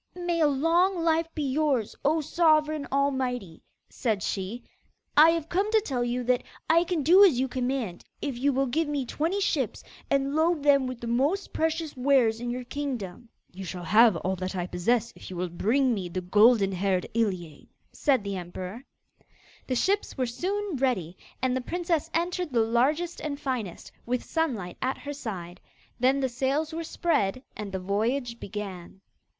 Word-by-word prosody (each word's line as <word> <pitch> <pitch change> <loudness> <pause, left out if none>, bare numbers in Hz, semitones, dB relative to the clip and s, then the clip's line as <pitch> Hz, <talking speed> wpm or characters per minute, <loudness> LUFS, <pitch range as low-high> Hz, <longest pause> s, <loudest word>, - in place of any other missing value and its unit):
'May 350 -1 -1
a 305 - +6
long 335 +6 +2
life 330 0 +2
be 305 - -2
yours, 275 -5 0
O 310 +3 +2
Sovereign 310 -2 +2
all 280 +1 +2
mighty!' 250 -10 -3 0.3
said 215 -7 -2
she. 200 +5 -3 0.5
'I 310 +2 +8
have 330 -2 0
come 390 +5 0
to 445 - +5
tell 265 - -2
you 245 +1 -1
that 250 0 +2 0.3
I 335 +2 +4
can 345 -4 -1
do 360 +7 +7
as 325 -11 +5
you 265 - +1
command 250 -7 -2 0.2
if 280 -4 -3
you 275 +4 +1
will 270 +1 +1
give 305 +5 0
me 285 -3 -1
twenty 330 +10 -1
ships, 400 - -1 0.3
and 275 +1 +1
load 320 -1 +2
them 280 -2 +4
with 255 -2 -6
the - - -5
most 275 +12 0
precious 320 -1 -1
wares 250 -4 +3
in 240 - -3
your 250 +1 -3
kingdom.' 240 -6 -5 0.2
'You 190 +2 -7
shall 180 0 -6
have 215 +4 +6
all 185 +3 -1
that 185 +1 -4
I 175 -1 -1
possess 220 +7 0
if - - -11
you 185 - -7
will 180 +1 -2
bring 245 +9 +2
me 190 -5 -3
the 185 +2 -3
golden 205 +2 +4
haired 185 -1 0
Iliane,' 185 -9 -2 0.2
said 265 -7 +1
the 200 -1 -3
emperor. 185 +6 -7 0.8
The 255 - 0
ships 395 +9 0
were 255 - +1
soon 370 - -2
ready, 200 -11 0 0.3
and 255 -1 +2
the 260 - -1
princess 340 +2 -1
entered 350 -1 -1
the 235 -2 +3
largest 290 +10 +1
and 285 -2 -4
finest, 250 - -4 0.2
with 250 0 -1
Sunlight 240 - -2
at 260 +1 -1
her 290 0 -6
side. 190 -10 -7 0.4
Then 260 +3 +3
the 265 - +2
sails 270 +5 -1
were 330 +1 -3
spread 255 - 0
and 210 -2 -6
the 190 - -2
voyage 235 +6 -1
began. 195 -3 -7
255 Hz, 180 wpm, -27 LUFS, 210-310 Hz, 0.8 s, I